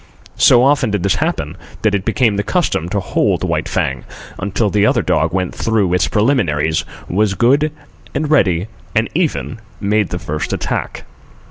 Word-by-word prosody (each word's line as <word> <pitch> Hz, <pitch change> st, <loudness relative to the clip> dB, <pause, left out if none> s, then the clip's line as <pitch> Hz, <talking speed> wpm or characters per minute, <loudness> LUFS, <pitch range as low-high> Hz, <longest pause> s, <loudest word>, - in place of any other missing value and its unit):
So 120 Hz, 0 st, +6 dB
often 140 Hz, -3 st, +3 dB
did 105 Hz, -3 st, -1 dB
this 100 Hz, -, +1 dB
happen, -, -, -2 dB, 0.3 s
that 110 Hz, -2 st, +2 dB
it 100 Hz, -2 st, -1 dB
became 115 Hz, -1 st, +2 dB
the 100 Hz, -, 0 dB
custom 105 Hz, -, -1 dB
to 100 Hz, -, -1 dB
hold 95 Hz, -, 0 dB
White -, -, -1 dB
Fang 65 Hz, -2 st, -1 dB, 0.4 s
until 100 Hz, +1 st, -1 dB
the 105 Hz, -1 st, +2 dB
other 105 Hz, -, +3 dB
dog -, -, +1 dB
went 90 Hz, -1 st, -1 dB
through 105 Hz, -6 st, 0 dB
its 90 Hz, -, +2 dB
preliminaries, 90 Hz, -, +1 dB, 0.2 s
was 100 Hz, +2 st, +1 dB
good 140 Hz, +8 st, +3 dB, 0.4 s
and 150 Hz, +2 st, -1 dB
ready, 95 Hz, -, +3 dB, 0.3 s
and 110 Hz, +1 st, +1 dB
even 155 Hz, -8 st, -1 dB, 0.2 s
made 105 Hz, 0 st, +1 dB
the 90 Hz, -, -3 dB
first 75 Hz, -3 st, -4 dB
attack. -, -, -3 dB
105 Hz, 165 wpm, -17 LUFS, 90-120 Hz, 0.4 s, So